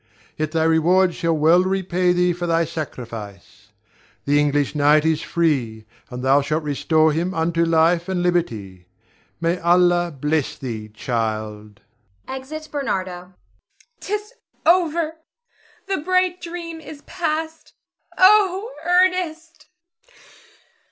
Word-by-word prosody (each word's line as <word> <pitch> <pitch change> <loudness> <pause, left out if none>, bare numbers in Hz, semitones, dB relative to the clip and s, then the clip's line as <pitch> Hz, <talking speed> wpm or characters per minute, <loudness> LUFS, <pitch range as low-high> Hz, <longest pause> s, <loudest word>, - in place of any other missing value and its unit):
Yet 155 0 -3
thy 160 -1 +1
reward 170 +3 +3
shall 165 -1 -1
well 160 +4 +5
repay 185 -1 0
thee 180 0 +2
for 175 0 -4
thy 165 0 +2
sacrifice. 110 - -8 0.6
The 145 +1 +3
English 145 -1 +1
knight 150 +1 +3
is 160 -1 +1
free, 130 -10 -1 0.2
and 125 0 -7
thou 135 +2 +4
shalt 155 +3 -2
restore 155 +2 +2
him 175 +4 -2
unto 165 +1 +1
life 165 +2 +2
and 180 -2 -1
liberty. 110 - -2 0.5
May 170 +2 0
Allah 175 0 +3
bless 150 0 -1
thee, 110 -5 -6
child! 110 -2 -4 0.5
[Exit 290 +4 -7
Bernardo. 195 -11 -2
Zara. 180 +1 -11 0.7
'Tis 420 +3 -4 0.3
over! 330 -2 +2 0.7
The 390 -1 -1
bright 365 +2 0
dream 335 -1 -7
is 305 -2 -11
past. 320 -2 -4 0.4
Oh, 395 +2 +4
Ernest! 350 -2 0
170 Hz, 120 wpm, -21 LUFS, -, 0.7 s, well